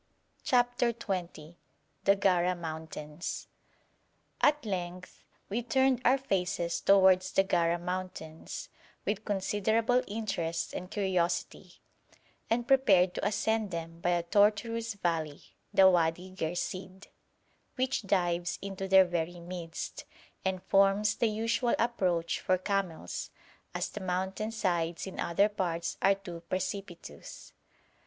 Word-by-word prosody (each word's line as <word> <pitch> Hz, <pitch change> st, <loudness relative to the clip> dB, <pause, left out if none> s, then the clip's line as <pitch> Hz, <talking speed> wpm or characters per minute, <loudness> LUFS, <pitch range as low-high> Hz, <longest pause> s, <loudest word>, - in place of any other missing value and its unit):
CHAPTER 245 Hz, -1 st, +2 dB
XX 175 Hz, -7 st, -5 dB, 0.5 s
THE 200 Hz, -, +6 dB
GARA 180 Hz, -2 st, +2 dB
MOUNTAINS 160 Hz, -1 st, -6 dB, 1.0 s
At 295 Hz, -3 st, +3 dB
length 180 Hz, -2 st, -5 dB, 0.2 s
we 220 Hz, +5 st, -1 dB
turned 260 Hz, +1 st, +2 dB
our 255 Hz, +3 st, +5 dB
faces 180 Hz, -8 st, -1 dB
towards 190 Hz, -1 st, +5 dB
the 195 Hz, -, +4 dB
Gara 175 Hz, -3 st, +2 dB
mountains, 175 Hz, -3 st, -6 dB, 0.4 s
with 210 Hz, 0 st, -1 dB
considerable 220 Hz, +4 st, +1 dB
interest 200 Hz, -6 st, -3 dB
and 180 Hz, -, -5 dB
curiosity, 185 Hz, -4 st, -1 dB, 0.8 s
and 235 Hz, +1 st, 0 dB
prepared 195 Hz, -10 st, +5 dB
to -, -, -4 dB
ascend 220 Hz, +1 st, 0 dB
them 165 Hz, -1 st, -6 dB
by 175 Hz, -, 0 dB
a 175 Hz, -1 st, +1 dB
tortuous 215 Hz, +4 st, +2 dB
valley, 165 Hz, -6 st, -2 dB, 0.3 s
the 190 Hz, -, +7 dB
Wadi 175 Hz, 0 st, +2 dB
Ghersìd, 185 Hz, +2 st, -4 dB, 0.7 s
which 260 Hz, +1 st, 0 dB
dives 180 Hz, -3 st, 0 dB
into 195 Hz, -1 st, -5 dB
their 190 Hz, 0 st, +7 dB
very 175 Hz, 0 st, -2 dB
midst, 170 Hz, -1 st, -6 dB, 0.4 s
and 190 Hz, -1 st, -1 dB
forms 195 Hz, +2 st, +3 dB
the 230 Hz, -, +2 dB
usual 230 Hz, +3 st, +1 dB
approach 180 Hz, -8 st, 0 dB
for 185 Hz, -, +2 dB
camels, 185 Hz, -, -3 dB, 0.5 s
as -, -, -1 dB
the 210 Hz, -, -8 dB
mountain 190 Hz, +3 st, -2 dB
sides 175 Hz, -6 st, -1 dB
in 190 Hz, -, -8 dB
other 185 Hz, +4 st, +3 dB
parts 170 Hz, -5 st, -2 dB
are 195 Hz, 0 st, +5 dB
too 175 Hz, -4 st, -9 dB
precipitous. 185 Hz, -, -6 dB
190 Hz, 120 wpm, -30 LUFS, 175-210 Hz, 1.0 s, the